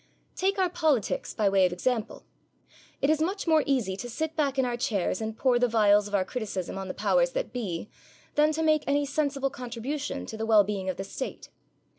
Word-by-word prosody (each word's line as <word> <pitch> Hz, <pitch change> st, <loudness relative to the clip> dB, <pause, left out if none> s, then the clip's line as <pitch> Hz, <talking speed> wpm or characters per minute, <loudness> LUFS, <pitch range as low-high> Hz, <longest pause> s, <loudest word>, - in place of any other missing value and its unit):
Take 390 Hz, +2 st, 0 dB
our 375 Hz, -1 st, +3 dB
politics, 310 Hz, -, 0 dB
by 210 Hz, -, +1 dB
way 195 Hz, -1 st, +4 dB
of -, -, -6 dB
example. 225 Hz, +5 st, -2 dB, 0.8 s
It 280 Hz, -, +4 dB
is 310 Hz, 0 st, +1 dB
much 380 Hz, +5 st, -1 dB
more 320 Hz, -2 st, +4 dB
easy 240 Hz, -9 st, +1 dB
to 245 Hz, -, -6 dB
sit 315 Hz, +6 st, -3 dB
back 280 Hz, -3 st, 0 dB
in 265 Hz, -, +3 dB
our 245 Hz, -1 st, -1 dB
chairs 225 Hz, -6 st, -1 dB
and 220 Hz, 0 st, -4 dB
pour 250 Hz, -2 st, +3 dB
the 245 Hz, -, +3 dB
vials 210 Hz, -2 st, +4 dB
of 205 Hz, -, -2 dB
our 190 Hz, -2 st, +2 dB
criticism 200 Hz, -8 st, -4 dB
on 195 Hz, 0 st, -5 dB
the 185 Hz, -, -5 dB
powers -, -, +2 dB
that -, -, -3 dB
be 205 Hz, -7 st, -3 dB, 0.5 s
than 300 Hz, +1 st, +4 dB
to 320 Hz, +1 st, -1 dB
make 310 Hz, -1 st, +3 dB
any 285 Hz, +1 st, +2 dB
sensible 280 Hz, -1 st, -1 dB
contribution 275 Hz, +3 st, -4 dB
to 220 Hz, -, -7 dB
the 220 Hz, -, -2 dB
well 215 Hz, -2 st, +6 dB
being 195 Hz, -2 st, -3 dB
of 185 Hz, -, -3 dB
the 195 Hz, -, -3 dB
State. 230 Hz, +7 st, -6 dB
250 Hz, 215 wpm, -27 LUFS, 210-300 Hz, 0.8 s, well